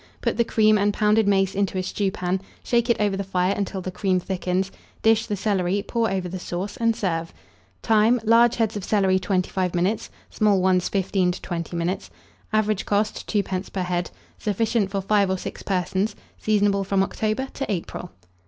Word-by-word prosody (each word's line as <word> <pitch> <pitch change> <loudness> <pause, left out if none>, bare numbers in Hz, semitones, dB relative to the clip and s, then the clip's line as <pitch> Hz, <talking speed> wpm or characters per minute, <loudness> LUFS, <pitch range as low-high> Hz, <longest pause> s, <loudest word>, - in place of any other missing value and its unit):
Put - - 0
the 235 - +4
cream 215 -2 +3
and 205 +1 +3
pounded 210 0 +3
mace 195 -1 +3
into 195 -1 -1
a 185 - 0
stewpan; 190 -1 -1 0.2
shake 240 0 +1
it 235 - +3
over 205 -2 +1
the 200 - -2
fire 185 0 +1
until 195 -1 -3
the 185 - -5
cream 185 -1 +1
thickens, 185 +1 -2 0.3
dish 225 0 +4
the 210 - -1
celery, 200 -1 0
pour 230 -1 +1
over 190 -2 -2
the 185 +1 -5
sauce, 180 +3 -4
and 230 -1 +1
serve. 165 -5 -2 0.5
Time. 225 +2 +4
Large 230 +1 +5
heads 225 -2 0
of 205 - -4
celery, 190 -2 +2
25 185 -1 -1
minutes; 185 +5 0 0.2
small 210 -2 +3
ones, 185 -1 +2
15 185 -2 +1
to - - -9
20 170 -1 -4
minutes. 170 +3 -2 0.4
Average 215 -2 +1
cost. 210 +1 0
2d. 195 -3 -1
per 190 - -2
head. 180 0 -1 0.3
Sufficient 215 0 0
for 195 0 -2
5 200 0 +2
or 190 - 0
6 - - -7
persons. 190 +2 -1 0.2
Seasonable 205 -2 +2
from 195 0 +2
October 220 +6 -2
to 275 - -3
April. 180 -1 -4
195 Hz, 180 wpm, -24 LUFS, 185-215 Hz, 0.5 s, Large